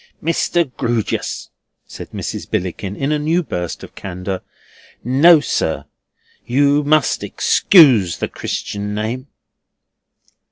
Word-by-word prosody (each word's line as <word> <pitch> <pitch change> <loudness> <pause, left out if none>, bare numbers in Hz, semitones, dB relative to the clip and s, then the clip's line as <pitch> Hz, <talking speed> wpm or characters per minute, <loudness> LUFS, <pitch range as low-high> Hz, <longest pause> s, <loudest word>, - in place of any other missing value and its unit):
"Mr. 170 +1 +1
Grewgious," 115 -2 -2 0.3
said - - -10
Mrs. - - -6
Billickin 95 +2 -3
in 135 +6 -2
a 150 - +1
new 165 +4 +1
burst 90 - -5
of - - -11
candour, 90 0 -5 0.6
"no, 150 +7 +6
sir! 145 - -2 0.6
You 140 +3 +2
must 155 0 +2
excuse 125 - +4
the - - -2
Christian 105 0 -4
name." 115 +6 -3
130 Hz, 110 wpm, -18 LUFS, 100-150 Hz, 0.6 s, no